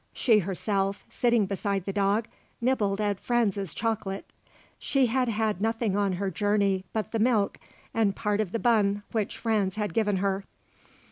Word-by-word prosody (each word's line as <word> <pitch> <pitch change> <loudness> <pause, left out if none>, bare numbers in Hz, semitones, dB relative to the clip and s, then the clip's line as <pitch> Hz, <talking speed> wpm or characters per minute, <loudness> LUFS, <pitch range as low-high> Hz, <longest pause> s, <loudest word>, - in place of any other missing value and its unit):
She 225 -4 +4
herself, 195 +1 -1
sitting 235 -3 +2
beside 195 -1 -2
the 195 - -3
dog, 205 +3 +1 0.3
nibbled 215 -5 +1
at 205 -2 0
Franz's 205 - 0
chocolate. 210 -2 -3 0.5
She 270 -2 +2
had 250 +1 +1
had 215 -3 0
nothing 225 -2 0
on 200 -2 +1
her 190 +1 -2
journey 200 -2 +1
but 220 -1 -3
the 225 - -1
milk 215 -3 +2 0.3
and 210 -3 +2
part 210 -1 0
of 200 -5 -3
the 230 - 0
bun 205 -4 +2
which 215 -3 -2
Franz 210 -5 0
had 210 -1 -2
given 210 -3 +1
her. 195 0 0
205 Hz, 160 wpm, -27 LUFS, 195-225 Hz, 0.5 s, She